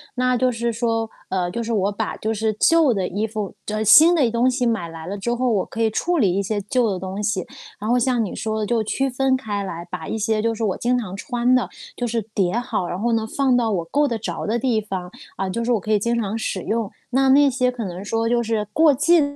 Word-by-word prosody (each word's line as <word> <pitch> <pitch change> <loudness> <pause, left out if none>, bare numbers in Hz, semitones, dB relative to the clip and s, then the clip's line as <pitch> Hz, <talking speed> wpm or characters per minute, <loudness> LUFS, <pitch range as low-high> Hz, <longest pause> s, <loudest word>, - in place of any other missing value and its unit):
那 255 0 +2
就 255 +1 +2
是 235 0 -1
说， 225 -1 -1 0.2
呃， 180 -2 -1
就 235 - -3
是 230 - -4
我 200 -1 +1
把 215 +2 -3
就 220 +1 -2
是 220 0 0
旧 325 -6 +5
的 190 -3 -1
衣 205 +4 -2
服 210 -2 -4
这 215 0 -2
新 315 - +8
的 275 -8 +3
东 240 +2 +3
西 250 0 0
买 215 -8 -1
来 165 0 -9
了 200 +2 -4
之 235 +5 -1
后， 250 +1 0
我 200 -4 +1
可 230 - -5
以 220 - +3
处 345 +10 0
理 195 -7 +3
一 200 - +1
些 205 +1 -2
旧 235 +3 +1
的 185 - -3
东 190 +2 -5
西。 200 -3 -1 0.3
然 210 +2 -3
后 245 - +4
像 245 -1 +1
你 200 - -5
说 220 0 -2
的 215 - -1
就 230 0 +1
区 270 +5 -1
分 265 +1 +1
开 205 -6 -3
来， 170 -2 -6
把 175 -3 -6
一 220 - -2
些 220 0 +1
就 230 0 +1
是 225 - -4
我 195 -4 0
经 250 +1 +1
常 190 -5 -5
穿 245 +3 +1
的 250 - +1 0.3
就 245 - -2
是 230 0 -1
叠 190 -1 +1
好， 240 -7 -1
然 180 - -4
后 235 +1 +1
呢， 225 -1 +1
放 270 -3 +3
到 230 -2 +1
我 175 -5 -1
够 290 - +1
得 235 -4 -2
着 220 - -4
的 220 +3 0
地 235 -4 +1
方。 190 -3 -5 0.3
嗯， 190 0 -2
就 235 +4 -2
是 245 - 0
我 230 - +3
可 215 +3 -4
以 210 - +3
经 235 +3 0
常 220 -1 -2
使 200 -4 -3
用。 220 -2 -2 0.2
那， 265 +1 +3
那 280 +1 +6
些 250 -1 +1
可 240 -3 -5
能 180 0 -6
说 225 +2 -1
就 240 0 +2
是 220 -2 -1
过 315 -2 +5
季 325 +5 +4
225 Hz, 290 characters per minute, -22 LUFS, 205-245 Hz, 0.3 s, 新